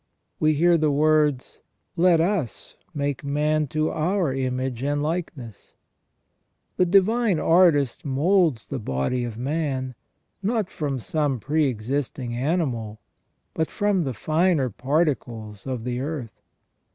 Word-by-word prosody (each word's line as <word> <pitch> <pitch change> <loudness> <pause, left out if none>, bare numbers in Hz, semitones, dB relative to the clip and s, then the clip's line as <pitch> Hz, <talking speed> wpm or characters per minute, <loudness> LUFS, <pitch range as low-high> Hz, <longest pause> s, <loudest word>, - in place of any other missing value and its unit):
We 155 0 +3
hear 170 +2 +4
the 155 -1 +2
words: 150 -2 +1 0.2
" - - -50
Let 175 -1 +4
us 170 - -2 0.2
make 145 -4 -3
man 150 +2 0
to 155 +4 -1
our 170 -2 0
image 130 -2 -2
and 145 +1 0
likeness 150 - -5 0.5
". - - -49
The 180 - +3
Divine 200 +2 +3
Artist 160 -8 +3
moulds 150 - +2
the 135 - -3
body 105 - -1
of 115 -2 -5
man, 135 -1 -2 0.5
not 215 -1 -1
from 145 -3 -2
some 140 +1 -1
pre 150 +6 +1
existing 125 +1 -3
animal, 120 -6 -1 0.5
but 160 - -1
from 205 -2 +1
the 135 -6 -3
finer 155 - +1
particles 125 - -2
of 125 -4 -3
the 125 0 -3
earth. 135 -4 -5
145 Hz, 130 wpm, -24 LUFS, 125-165 Hz, 0.5 s, hear